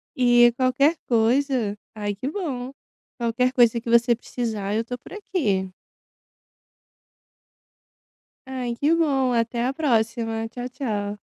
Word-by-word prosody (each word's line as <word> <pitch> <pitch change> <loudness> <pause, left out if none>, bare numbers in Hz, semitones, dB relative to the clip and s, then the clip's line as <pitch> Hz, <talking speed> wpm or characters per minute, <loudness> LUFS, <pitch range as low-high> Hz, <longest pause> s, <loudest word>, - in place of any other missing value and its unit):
e 240 -2 +5
qualquer 270 +5 +3
coisa 235 -2 +1 0.2
ai 205 -2 -3
que 255 +7 -4
bom, 270 -9 -4 0.5
qualquer 240 +2 +1
coisa 240 -3 +3
que 235 - -7
você 235 +1 +4
precisar 220 -4 -4
eu 225 +1 0
tô 245 +1 -5
por - - -16
aqui. 210 - -1 2.8
Ai 250 -2 -3
que 295 +6 +2
bom, 275 -6 +2
até 235 0 0
a 260 - 0
próxima! 230 -5 0
Tchau, 245 +1 -6
tchau. 210 -6 -4
240 Hz, 120 wpm, -24 LUFS, 225-260 Hz, 2.8 s, e